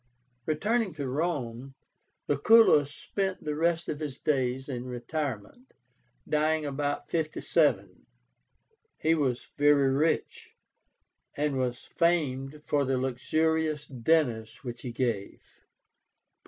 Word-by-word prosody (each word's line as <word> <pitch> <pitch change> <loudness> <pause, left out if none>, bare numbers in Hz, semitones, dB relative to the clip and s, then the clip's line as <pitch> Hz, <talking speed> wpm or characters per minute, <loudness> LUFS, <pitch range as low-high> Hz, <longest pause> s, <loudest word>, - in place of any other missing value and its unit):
Returning 210 +7 0
to 140 -4 -3
Rome, 135 -3 -3 0.5
Lucullus 145 -2 +5
spent 190 +3 -3
the 150 -1 -2
rest 170 +2 +1
of 150 - -3
his 145 -4 -5
days 130 -2 0
in 125 -3 -4
retirement, 130 - -5 0.5
dying 155 0 +1
about 145 0 -3
57. 160 -2 0 0.9
He 160 - +2
was 135 -6 -1
very 145 -2 +5
rich, 155 +4 -1 0.8
and 145 -1 0
was 125 -1 -2
famed 150 -4 0
for 145 -1 +1
the 135 -1 0
luxurious 155 +4 0
dinners 120 -4 0
which 120 -2 -6
he 125 - -5
gave. 115 -5 -2
145 Hz, 105 wpm, -28 LUFS, 130-160 Hz, 0.9 s, Lucullus